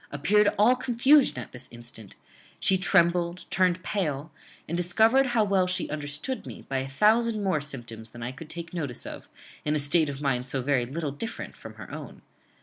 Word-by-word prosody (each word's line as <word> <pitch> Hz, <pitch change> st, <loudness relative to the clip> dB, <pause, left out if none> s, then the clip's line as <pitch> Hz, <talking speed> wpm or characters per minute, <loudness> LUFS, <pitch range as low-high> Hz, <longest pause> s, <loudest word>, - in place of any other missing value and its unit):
appeared 205 Hz, +9 st, +3 dB
all 220 Hz, +5 st, +5 dB
confusion 255 Hz, -, +4 dB
at 125 Hz, -, -6 dB
this 125 Hz, +1 st, -9 dB
instant. 120 Hz, -3 st, -10 dB, 0.4 s
She 190 Hz, -, +4 dB
trembled, 175 Hz, -1 st, +2 dB
turned 185 Hz, -1 st, +2 dB
pale, 155 Hz, -6 st, -2 dB, 0.4 s
and 170 Hz, -, -2 dB
discovered 220 Hz, +10 st, +4 dB
how 240 Hz, -3 st, +2 dB
well 195 Hz, -3 st, +2 dB
she 180 Hz, -4 st, -1 dB
understood 150 Hz, -, -3 dB
me, -, -, -9 dB
by 135 Hz, -1 st, -1 dB
a 130 Hz, -, -3 dB
thousand 215 Hz, -, +3 dB
more 185 Hz, -6 st, +1 dB
symptoms 120 Hz, -6 st, -7 dB
than 120 Hz, +1 st, -9 dB
I 125 Hz, -, -3 dB
could 155 Hz, +4 st, -11 dB
take 170 Hz, 0 st, -7 dB
notice 145 Hz, -8 st, -4 dB
of, -, -, -8 dB, 0.3 s
in 150 Hz, 0 st, 0 dB
a -, -, +1 dB
state 150 Hz, +2 st, +2 dB
of 140 Hz, -1 st, -5 dB
mind 130 Hz, -3 st, 0 dB
so 130 Hz, 0 st, -2 dB
very 130 Hz, -3 st, +1 dB
little 150 Hz, +2 st, -3 dB
different 185 Hz, +11 st, -6 dB
from -, -, -11 dB
her -, -, -10 dB
own. -, -, -9 dB
165 Hz, 190 wpm, -27 LUFS, 135-200 Hz, 0.4 s, all